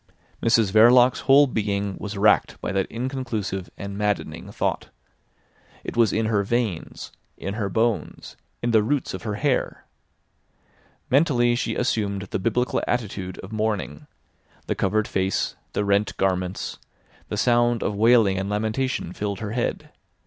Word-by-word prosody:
Mrs 115 -3 +3
Verloc's 120 +4 +6
whole 140 +2 +6
being 100 -5 -2
was 105 0 -5
racked 105 +2 +3
by - - -3
that 95 0 0
inconclusive 115 -7 -3
and 100 0 -6
maddening 105 -1 -2
thought. - - -2 0.9
It - - -6
was 115 -4 +4
in 110 +1 0
her 110 -2 +2
veins, 110 -5 -3 0.3
in 100 - -4
her 105 -2 -2
bones, 110 +2 -1 0.3
in 120 - +1
the 110 -2 +5
roots 135 +5 -1
of - - -5
her 105 -2 -3
hair. 135 +3 -1 1.3
Mentally 125 -4 +3
she 120 - -1
assumed 100 -5 -1
the 95 - -4
biblical 115 +5 0
attitude 100 -6 -3
of 95 - -10
mourning—the 105 -9 -5
covered 105 +3 0
face, 95 0 -1 0.2
the 105 - 0
rent 100 0 +1
garments; 95 -1 -1 0.5
the - - -3
sound 120 -1 +2
of 105 - -1
wailing 110 -2 +4
and 95 +1 -3
lamentation 110 -1 -2
filled 100 0 -3
her 105 0 -5
head. 120 +1 -3
110 Hz, 140 wpm, -24 LUFS, 100-120 Hz, 1.3 s, Verloc's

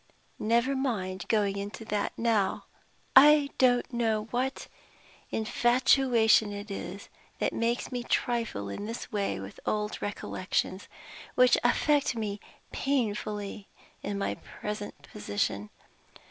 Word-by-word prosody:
Never 235 +5 +2
mind 200 -8 -2
going 205 -3 +1
into 205 +3 -6
that 210 -1 -1
now! 225 -4 +1 0.5
I 290 +1 +8
don't 245 -1 +3
know 225 -3 +1
what 260 +2 -2 0.6
infatuation 240 -1 +3
it 205 +1 -7
is 195 0 -6 0.3
that - - 0
makes 235 +3 -1
me 250 -1 -2
trifle 230 - -1
in 100 - -5
this 230 +2 -6
way 200 - -1
with 95 +1 -9
old 210 0 -2
recollections, 190 -1 -2 0.5
which 250 -1 +6
affect 280 +2 +2
me 210 -2 -3 0.3
painfully 210 -6 -2 0.3
in 205 - -3
my 200 - -1
present 210 -4 -7
position. 105 -3 -3
220 Hz, 115 wpm, -29 LUFS, 200-245 Hz, 0.6 s, I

